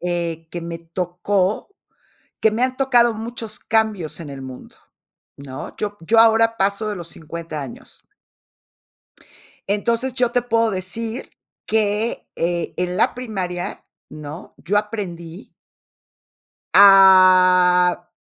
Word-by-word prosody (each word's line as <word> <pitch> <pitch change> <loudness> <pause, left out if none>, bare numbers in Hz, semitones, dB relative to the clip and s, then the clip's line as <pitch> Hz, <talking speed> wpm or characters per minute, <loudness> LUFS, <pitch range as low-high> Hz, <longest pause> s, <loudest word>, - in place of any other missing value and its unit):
eh, 170 -2 -3
que 175 - -5
me 170 0 -6
tocó 180 +4 -2 0.7
que 220 - +4
me 230 +3 -1
han 255 0 0
tocado 245 -3 +3
muchos 225 -1 -6
cambios 215 -8 -1
en 150 - -8
el 135 -1 -8
mundo, 130 -1 -11 0.6
¿no? 135 -2 -9
Yo 205 -1 -4
yo 220 +8 +1
ahora 225 0 +4
paso 200 +2 0
de 210 - -4
los 170 -2 -8
50 165 -1 -7
años. 135 -3 -12 1.6
Entonces, 230 +5 -1
yo 245 -2 0
te 245 - +2
puedo 230 -2 +1
decir 225 +6 -5 0.4
que, 215 +1 -1
eh, 170 0 -2
en 180 0 -2
la - - +2
primaria, 190 -8 -5 0.3
¿no? 150 +2 -10
Yo 200 +6 0
aprendí 190 -4 -6 1.2
a 185 -2 +6
190 Hz, 120 wpm, -20 LUFS, 170-225 Hz, 1.6 s, a